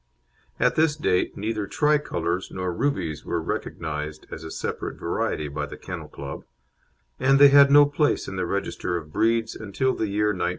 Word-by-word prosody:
At - - +3
this 155 -1 +3
date 90 -12 0
neither 105 0 -2
Tricolours 95 - 0
nor 90 -1 -3
Rubies 85 - -2
were 85 - -2
recognised 75 -1 -4
as 80 - -7
a 80 - -7
separate - - -5
variety 75 - -2
by 70 - -4
the - - -9
Kennel - - -7
Club, 70 0 -8 0.8
and 135 +1 +4
they 140 0 +9
had 140 0 +7
no 145 +1 +8
place 145 +1 0
in - - -5
the - - -2
register 90 - -2
of 75 -2 -9
breeds 115 0 +1
until 110 +5 -1
the 110 - -2
year 105 +1 +1
1902. 90 -4 0
105 Hz, 175 wpm, -25 LUFS, 80-140 Hz, 0.8 s, they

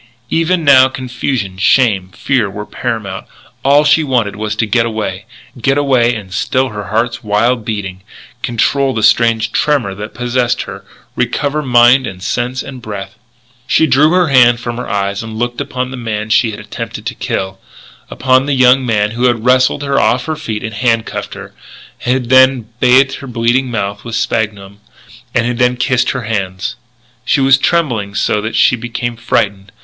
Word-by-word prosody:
Even 165 +1 +1
now 130 -3 +7
confusion, 125 -6 -4
shame, 100 -2 +2
fear 120 +1 -1
were 105 +2 -7
paramount. 100 -5 -5 0.4
All 140 +2 +4
she 150 +2 +4
wanted 125 -8 0
was 105 +1 -3
to 110 - 0
get 115 +2 +2
away, 110 -3 -4 0.4
get 135 +4 +2
away 125 -4 +2
and 100 -4 -8
still 130 +6 0
her 105 -2 -6
heart's 115 +4 -2
wild 115 +3 +1
beating, 100 -4 -5 0.4
control 135 +3 0
the 110 - -2
strange 115 -1 +3
tremor 135 -10 0
that 105 +3 -8
possessed 125 0 0
her, - - -9 0.3
recover 145 +1 -1
mind 125 0 +4
and 90 -1 -8
sense 125 +5 -2
and 130 -2 -9
breath. 100 -3 -7 0.5
She 160 - +3
drew 145 +2 +4
her 180 -3 +3
hand 120 -3 +5
from 120 0 -5
her 125 - -5
eyes 100 -1 -1
and 110 0 -7
looked 120 +1 -2
upon 125 0 -4
the 135 - -6
man 110 -2 -4
she 115 - +3
had 105 - -7
attempted - - -7
to - - -3
kill, 95 0 -4 0.5
upon 130 +1 +1
the 145 - +1
young 130 +1 +4
man 105 -4 0
who 120 +2 -1
had 120 -2 +1
wrestled 130 +3 +3
her 140 -1 +1
off 125 +1 +1
her 155 - -2
feet 115 -9 -5
and 110 0 -5
handcuffed 115 0 -1
her, - - -10 0.5
and 125 0 0
who - - +6
had 120 -3 -9
bathed 130 +2 +4
her 140 - -9
bleeding 120 +2 0
mouth 100 -3 -3
with 115 -1 -5
sphagnum, 100 -3 -2 0.6
and 120 -1 +2
who 120 - 0
had 125 0 +1
kissed 125 -1 +1
her 130 -2 -3
hands 100 -3 -3 0.5
She 130 - +1
was 135 0 +4
trembling 120 -13 0
so 105 +1 0
that 110 +2 -4
she - - +4
became 120 0 -4
frightened. 100 -3 -1
120 Hz, 180 wpm, -14 LUFS, 105-130 Hz, 0.6 s, now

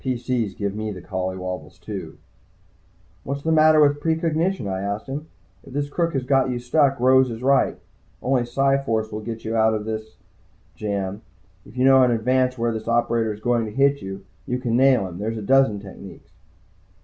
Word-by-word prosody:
PC's 125 -5 -2
give 100 -3 -3
me 110 +1 -4
the 95 - -7
colly 95 0 -4
wobbles, 90 -1 -6
too. 95 +2 -7 1.1
"What's 140 +1 -4
the 160 - 0
matter 155 0 +5
with 145 -1 +4
precognition?" 165 - 0
I 95 -1 -3
asked 100 +2 -3
him. 145 +4 -6 0.4
"If 135 - -13
this 145 +1 -2
crook 170 +1 0
has 135 -2 -1
got 135 0 +2
you 125 - -2
stuck, 135 +2 +2
Rose 130 +1 +5
is 115 +1 -7
right. 135 +1 +3 0.4
Only 130 -1 +1
Psi 135 +3 +2
force 110 -4 -1
will 105 - -4
get 115 +1 -7
you 110 +1 -2
out 110 0 +3
of 105 -1 -4
this 110 0 -5 0.6
jam. 100 +1 -3 0.5
If 115 - -14
you 130 - +2
know 135 0 +7
in 125 - +4
advance 125 +2 +1
where 115 0 0
this 110 -1 -5
operator 115 -1 +1
is 105 0 -8
going 120 0 +1
to 105 - -6
hit 140 +4 +2
you, 95 0 -7 0.2
you 125 - -1
can 120 -2 -1
nail 130 -4 +4
him. 90 0 -9
There's 110 +2 -3
a 110 - -5
dozen 135 -3 +3
techniques." 100 -1 -12
120 Hz, 195 wpm, -23 LUFS, 105-135 Hz, 1.1 s, know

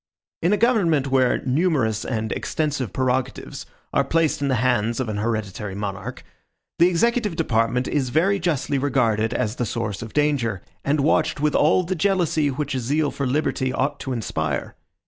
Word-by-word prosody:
In 175 - +2
a 210 - +3
government 170 - +2
where 130 -2 +2
numerous 130 - +1
and 110 -2 -2
extensive 145 - -2
prerogatives 130 0 -2 0.3
are - - +3
placed 165 -3 +1
in 140 - +1
the 130 - +2
hands 120 -1 +1
of 125 -4 -2
an 105 - -3
hereditary 105 -3 -3
monarch, 105 +4 -5 0.6
the 170 - +7
executive 210 +2 +1
department 125 -4 +1
is 135 -4 0
very 190 +9 +2
justly 150 -5 0
regarded 115 -5 +1
as 120 -2 -1
the - - 0
source 105 -3 -3
of 115 - -8
danger, 135 -10 0 0.2
and 145 +1 +1
watched 155 +1 +2
with 150 0 +1
all 165 +5 +4
the 180 +2 -2
jealousy 175 -5 +1
which 145 +1 -3
a 130 - -1
zeal 145 +5 0
for 140 - -2
liberty 130 -1 0
ought 130 +2 -1
to 135 - -5
inspire. 90 -10 -2
130 Hz, 170 wpm, -23 LUFS, 115-155 Hz, 0.6 s, the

